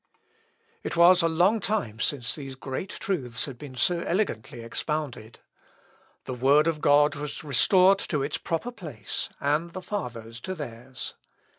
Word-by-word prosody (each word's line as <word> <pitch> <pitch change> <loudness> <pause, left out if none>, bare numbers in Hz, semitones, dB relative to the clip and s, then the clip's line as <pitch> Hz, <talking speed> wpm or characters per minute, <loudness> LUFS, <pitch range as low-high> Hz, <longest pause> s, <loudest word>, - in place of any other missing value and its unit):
] - - -39 0.3
It - - -3
was 175 +2 +7
a 165 - +3
long 180 +7 +3
time 195 - -1
since 125 -1 0
these 135 -3 -6
great 135 +8 -5
truths 135 - -2
had 130 -4 -9
been 140 -3 -9
so 170 +7 +2
elegantly 170 - -2
expounded. 125 -1 -4 0.9
The 130 - -4
Word 140 +5 +4
of 165 -2 0
God 145 +1 +5
was 145 +1 -6
restored 185 +7 +5
to 150 -7 -1
its 145 +2 -2
proper 170 +9 -2
place, 150 - -5
and 150 +4 +1
the 185 - -5
Fathers 115 - -5
to 185 +10 -5
theirs. 125 -4 -6
150 Hz, 155 wpm, -27 LUFS, 125-175 Hz, 0.9 s, was